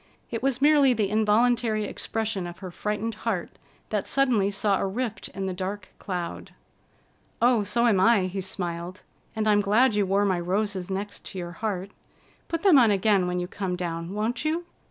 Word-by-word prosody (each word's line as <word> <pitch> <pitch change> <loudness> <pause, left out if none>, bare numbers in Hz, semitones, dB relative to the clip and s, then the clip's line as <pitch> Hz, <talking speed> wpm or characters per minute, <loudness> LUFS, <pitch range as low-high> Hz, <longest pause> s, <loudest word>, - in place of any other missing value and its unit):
It 230 -1 -3
was 265 0 0
merely 290 -3 +6
the 210 -3 0
involuntary 220 +1 +2
expression 210 -2 -3
of 175 0 -9
her 185 -2 -8
frightened 210 +4 -3
heart 200 -7 -3 0.3
that 210 -2 -1
suddenly 245 -8 +2
saw 200 -1 +1
a - - 0
rift 220 +2 -3
in 195 0 -5
the 190 - -2
dark 190 +2 -5
cloud. 180 -3 -5 0.8
"Oh, 240 -2 +4
so 235 +4 +1
am 215 -5 +4
I," 205 +2 +5
he 190 +1 -3
smiled. 180 -1 -4 0.3
"And 220 0 -1
I'm 205 -1 +4
glad 220 +5 +3
you 205 -2 +1
wore 200 +2 +2
my 185 -3 +1
roses 190 +1 -2
next 195 +1 -5
your 175 -2 -5
heart. 195 +1 -4 0.6
Put 330 -1 -3
them 360 -9 +7
on 235 -3 +5
again 200 -2 +3
when 180 0 -1
you 180 - -2
come 190 -1 -3
down, 170 +1 -4
won't 220 +6 -1
you?" 325 +3 -1
205 Hz, 180 wpm, -26 LUFS, 185-230 Hz, 0.8 s, them